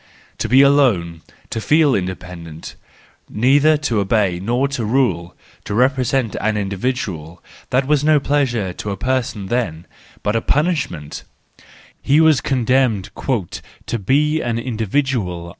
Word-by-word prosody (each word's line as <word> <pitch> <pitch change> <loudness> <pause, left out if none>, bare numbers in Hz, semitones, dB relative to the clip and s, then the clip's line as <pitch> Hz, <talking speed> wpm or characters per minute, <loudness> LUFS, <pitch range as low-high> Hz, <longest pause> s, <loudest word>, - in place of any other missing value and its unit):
To - - -2
be 130 +2 +6
alone, 110 - +2 0.3
to 110 - -3
feel 150 +2 +3
independent, 90 -4 -5 0.6
neither 145 +7 +3
to 115 -6 +1
obey 100 -3 +1
nor 120 +8 0
to 140 -4 -3
rule, 105 -8 0 0.3
to 100 - -3
represent 130 -1 +1
an 110 0 0
individual—that 100 - -3
was 145 0 +1
no 155 -1 +4
pleasure 125 -10 0
to 105 - -6
a 100 - -3
person 120 -2 -2
then, 95 -7 -2 0.4
but 105 - 0
a 115 - +1
punishment; 145 - -1 0.8
he 145 +3 +3
was 160 -4 +4
condemned 125 -5 +1
"to 120 - -4
be 150 +9 +1
an 115 -1 -2
individual." 115 -6 -2
115 Hz, 125 wpm, -19 LUFS, 95-135 Hz, 0.8 s, be